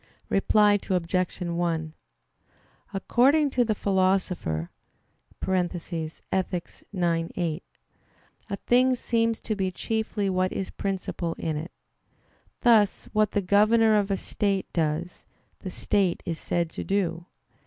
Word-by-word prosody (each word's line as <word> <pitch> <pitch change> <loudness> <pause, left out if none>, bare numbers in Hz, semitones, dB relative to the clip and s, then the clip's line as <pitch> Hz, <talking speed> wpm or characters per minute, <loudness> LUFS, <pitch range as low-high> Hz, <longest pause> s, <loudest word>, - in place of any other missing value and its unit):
Reply 205 +1 +4
Obj. 185 0 0
1: 170 -2 -1 1.0
According 270 +9 +3
to 250 - +3
the 220 -2 0
Philosopher 185 - 0 0.7
(Ethic. 175 0 -2 0.2
ix, - - -18 0.2
8), 165 0 -1 0.9
a 200 - -1
thing 255 +1 +4
seems 230 -2 0
to 215 - -2
be 190 -2 0
chiefly 215 +1 -2
what 185 -1 +1
is 190 - -4
princip[al] 185 -3 -3
in 160 -1 -2
it; 155 +4 -5 0.9
thus 220 -4 +4
what 215 -1 +3
the 205 - +1
governor 215 +3 +4
of 200 0 -1
a 195 - +1
state 195 -1 -1
does, 165 +1 -2 0.3
the 190 - -6
state 185 0 0
is 165 -3 -3
said 170 -2 -1
to - - -5
do. 175 -3 -1
190 Hz, 120 wpm, -26 LUFS, 170-210 Hz, 1.0 s, Reply